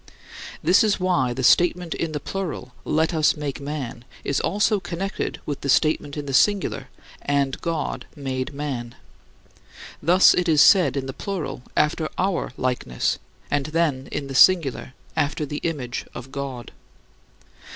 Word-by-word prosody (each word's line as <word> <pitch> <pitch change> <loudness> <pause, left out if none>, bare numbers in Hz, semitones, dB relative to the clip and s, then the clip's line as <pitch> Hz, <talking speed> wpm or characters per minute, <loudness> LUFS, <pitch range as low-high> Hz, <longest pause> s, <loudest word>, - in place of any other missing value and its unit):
This 180 +7 +5
is 210 -2 +1
why 180 -9 +1
the 130 +2 -3
statement 175 +4 +3
in 165 - -3
the 150 - -3
plural, 160 -8 -5
"Let 160 +2 +1
us 155 -1 +3
make 145 -2 -4
man," 140 -5 -5 0.2
is 140 - 0
also 210 +2 +1
connected 190 +1 -4
with 145 - -4
the 140 - -3
statement 150 0 +2
in 145 - -4
the 135 - -4
singular, 205 +7 +2 0.3
"And 140 -1 0
God 165 -2 -3
made 135 -1 -3
man." 135 -5 -5 1.1
Thus 180 +5 +6
it 180 -1 +1
is 155 -2 +4
said 180 -2 +6
in 135 - -2
the 135 - -5
plural, 160 -10 -4 0.2
"After 155 +1 +1
our 190 -5 0
likeness," 125 - -1 0.3
and 145 -1 0
then 155 -4 0
in 140 - -3
the 135 - -7
singular, 140 -3 +4 0.2
"After 150 +1 0
the 145 +1 -5
image 135 -7 -3
of 125 +2 -8
God." 135 -4 -6
145 Hz, 150 wpm, -23 LUFS, 135-170 Hz, 1.1 s, Thus